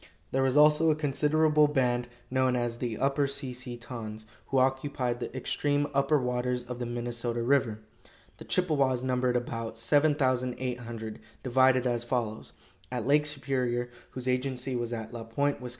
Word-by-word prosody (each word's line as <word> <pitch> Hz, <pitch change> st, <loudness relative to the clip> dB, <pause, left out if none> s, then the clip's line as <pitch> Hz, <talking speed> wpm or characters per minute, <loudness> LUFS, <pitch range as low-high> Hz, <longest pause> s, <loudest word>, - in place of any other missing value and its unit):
There 135 Hz, -, +1 dB
was 135 Hz, +1 st, +2 dB
also 150 Hz, +2 st, +6 dB
a 155 Hz, -, +4 dB
considerable 150 Hz, +1 st, +3 dB
band, 125 Hz, -4 st, +1 dB, 0.2 s
known 130 Hz, -1 st, +2 dB
as 120 Hz, -1 st, -1 dB
the 120 Hz, -3 st, -3 dB
Upper 140 Hz, +1 st, +1 dB
Si 135 Hz, -2 st, -2 dB
si 125 Hz, -1 st, -6 dB
tons, 110 Hz, -3 st, -7 dB, 0.2 s
who 135 Hz, -, 0 dB
occupied 130 Hz, -2 st, +1 dB
the -, -, -4 dB
extreme 145 Hz, +3 st, 0 dB
upper 140 Hz, +2 st, +3 dB
waters 125 Hz, 0 st, -1 dB
of 125 Hz, 0 st, -7 dB
the 120 Hz, -, -3 dB
Minnesota 120 Hz, 0 st, -2 dB
river. 120 Hz, -4 st, +2 dB, 0.6 s
The -, -, -11 dB
Chippewas 140 Hz, -8 st, +1 dB
numbered 125 Hz, -1 st, +1 dB
about 115 Hz, -2 st, -3 dB
7,800, 125 Hz, -4 st, 0 dB, 0.2 s
divided 130 Hz, 0 st, +4 dB
as 120 Hz, -2 st, 0 dB
follows: 120 Hz, -3 st, -3 dB, 0.4 s
At 125 Hz, -3 st, -2 dB
Lake 150 Hz, +2 st, +4 dB
Superior, 130 Hz, -4 st, -1 dB, 0.2 s
whose 130 Hz, 0 st, -5 dB
agency 130 Hz, 0 st, -1 dB
was 120 Hz, -1 st, -2 dB
at 115 Hz, -1 st, -5 dB
La 115 Hz, -1 st, -5 dB
Pointe, 140 Hz, +5 st, -1 dB
Wis. 125 Hz, -, -5 dB
125 Hz, 155 wpm, -29 LUFS, 120-140 Hz, 0.6 s, also